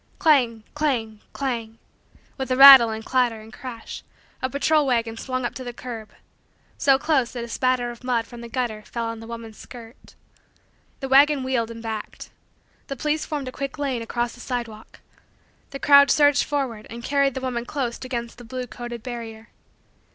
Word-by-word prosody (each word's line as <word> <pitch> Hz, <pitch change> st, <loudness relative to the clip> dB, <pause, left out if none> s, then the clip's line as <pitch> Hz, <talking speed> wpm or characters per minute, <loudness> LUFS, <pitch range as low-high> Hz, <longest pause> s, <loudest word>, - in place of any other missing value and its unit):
Clang, 245 Hz, -8 st, +3 dB
clang, 245 Hz, -8 st, -1 dB
clang, 230 Hz, -5 st, -4 dB, 0.6 s
with 265 Hz, -1 st, -5 dB
a 255 Hz, -, +2 dB
rattle 270 Hz, -4 st, +11 dB
and 220 Hz, 0 st, -5 dB
clatter 245 Hz, -3 st, +1 dB
and 215 Hz, 0 st, -14 dB
crash, 240 Hz, -3 st, -8 dB, 0.4 s
a 260 Hz, -, -1 dB
patrol 290 Hz, +2 st, +2 dB
wagon 230 Hz, -3 st, 0 dB
swung 255 Hz, +1 st, -3 dB
up -, -, -3 dB
to 260 Hz, -, -7 dB
the 245 Hz, -1 st, -6 dB
curb 230 Hz, -3 st, -8 dB, 0.7 s
so 270 Hz, -1 st, +4 dB
close 275 Hz, -4 st, 0 dB
that 240 Hz, -2 st, -4 dB
a -, -, -6 dB
spatter 250 Hz, 0 st, 0 dB
of 240 Hz, +1 st, -13 dB
mud 240 Hz, -3 st, 0 dB
from 240 Hz, 0 st, -11 dB
the 235 Hz, -, -9 dB
gutter 230 Hz, -3 st, -2 dB
fell 230 Hz, +2 st, -5 dB
on 230 Hz, 0 st, -5 dB
the 225 Hz, -, -10 dB
woman's 230 Hz, -2 st, -9 dB
skirt. 235 Hz, +1 st, -13 dB, 0.9 s
The 270 Hz, -, -3 dB
wagon 280 Hz, +1 st, +5 dB
wheeled 250 Hz, -3 st, -1 dB
and 230 Hz, 0 st, -9 dB
backed. 220 Hz, -2 st, -6 dB, 0.6 s
The 275 Hz, -, -4 dB
police 300 Hz, +4 st, -1 dB
formed 295 Hz, -5 st, -4 dB
a -, -, -4 dB
quick 275 Hz, +2 st, -5 dB
lane 270 Hz, -5 st, -2 dB
across 240 Hz, +1 st, -2 dB
the -, -, -15 dB
sidewalk. 235 Hz, -4 st, -6 dB, 0.7 s
The 275 Hz, -, -6 dB
crowd 280 Hz, 0 st, +6 dB
surged 290 Hz, -1 st, +4 dB
forward 265 Hz, -7 st, -3 dB
and 235 Hz, +1 st, -8 dB
carried 275 Hz, -1 st, +1 dB
the 265 Hz, -, -3 dB
woman 250 Hz, -2 st, -2 dB
close 245 Hz, -4 st, -3 dB
against 240 Hz, -2 st, -5 dB
the -, -, -10 dB
blue 250 Hz, +2 st, -5 dB
coated 240 Hz, -1 st, -8 dB
barrier. 230 Hz, -3 st, -7 dB
245 Hz, 180 wpm, -23 LUFS, 230-270 Hz, 0.9 s, rattle